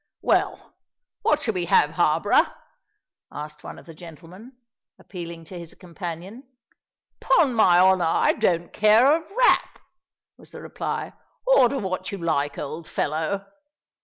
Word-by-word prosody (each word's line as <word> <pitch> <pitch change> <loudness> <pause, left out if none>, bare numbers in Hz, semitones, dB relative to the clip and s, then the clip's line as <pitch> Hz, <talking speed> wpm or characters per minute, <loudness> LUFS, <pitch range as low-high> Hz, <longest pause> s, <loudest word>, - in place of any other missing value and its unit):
"Well, - - 0 0.5
what 300 0 +1
shall 225 - -1
we 180 -2 -2
have, 150 -2 +3
Harborough?" 165 -2 +2 0.8
asked 150 0 -9
one - - -9
of - - -14
the 165 - -12
gentlemen, 170 - -13 0.4
appealing 170 -3 -9
to 180 +2 -9
his 170 -1 -11
companion. 180 +6 -8 0.8
"'Pon 275 -6 +3
my 190 -6 +4
honour, 185 -1 +4
I 165 - +2
don't 175 -1 -1
care 215 +3 +4
a 310 +4 +3
rap," - - +3 0.6
was - - -17
the - - -9
reply. - - -5 0.3
"Order 280 - +4
what 185 -5 -4
you 200 - -5
like, 150 -5 -1
old 155 +3 -6
fellow." 160 +6 -2
180 Hz, 135 wpm, -23 LUFS, 165-215 Hz, 0.8 s, my